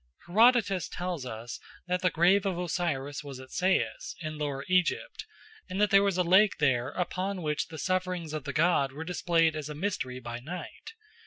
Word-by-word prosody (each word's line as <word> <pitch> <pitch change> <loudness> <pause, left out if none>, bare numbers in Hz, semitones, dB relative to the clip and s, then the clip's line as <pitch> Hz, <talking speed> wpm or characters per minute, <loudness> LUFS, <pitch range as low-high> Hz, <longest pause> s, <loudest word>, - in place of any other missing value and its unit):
Herodotus 205 -1 +4
tells 175 -7 -4
us 120 +1 -7 0.3
that 180 0 0
the 180 - +3
grave 180 +4 +4
of 185 -3 -1
Osiris 155 -5 -2
was 140 -3 -8
at 130 0 -12
Sais 185 +1 0
in 155 -2 -5
Lower 140 -2 -3
Egypt, 185 - 0 0.4
and 185 - -3
that 210 -1 +3
there 195 -1 +7
was 200 -2 +1
a 180 - +3
lake 190 +4 +5
there 130 -4 +2
upon 185 +3 -3
which 150 -1 -1
the 160 - -9
sufferings 180 -2 -2
of 150 -2 -4
the 140 - -3
god 155 -4 +2
were 155 +3 -6
displayed 165 -2 +1
as 155 -1 -5
a 150 - -6
mystery 145 -8 -3
by 120 -1 -6
night. 175 - -8
170 Hz, 185 wpm, -29 LUFS, 145-185 Hz, 0.4 s, there